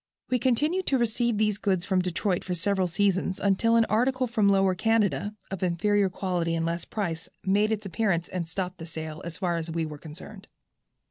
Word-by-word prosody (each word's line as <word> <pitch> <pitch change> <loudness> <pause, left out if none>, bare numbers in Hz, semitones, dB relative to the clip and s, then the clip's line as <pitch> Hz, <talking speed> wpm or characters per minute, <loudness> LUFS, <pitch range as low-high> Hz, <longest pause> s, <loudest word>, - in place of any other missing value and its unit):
We 250 - +3
continued 300 +10 +1
to 270 - +3
receive 235 -1 +1
these 210 -1 +1
goods 190 -4 0
from 190 -2 +2
Detroit 180 +1 -1
for 180 - -3
several 190 +2 +1
seasons, 190 +1 0
until 205 +4 +2
an 230 -1 +5
article 255 +4 +1
from 220 -4 +2
Lower 195 -1 +4
Canada, 210 +1 +1 0.2
of 195 - -4
inferior 190 +3 +2
quality 175 -3 -1
and 165 0 -1
less 170 0 -2
price, 170 -7 -3 0.2
made 205 +3 +3
its 215 -1 -2
appearance, 185 -2 0
and 175 -3 -4
stopped 180 +1 -3
the 165 - -7
sale, 155 -1 -6
as 170 -1 -5
far 175 -2 0
as 165 0 -4
we 165 0 -1
were 150 -1 -7
concerned." 185 +7 -11
195 Hz, 195 wpm, -27 LUFS, 170-215 Hz, 0.2 s, an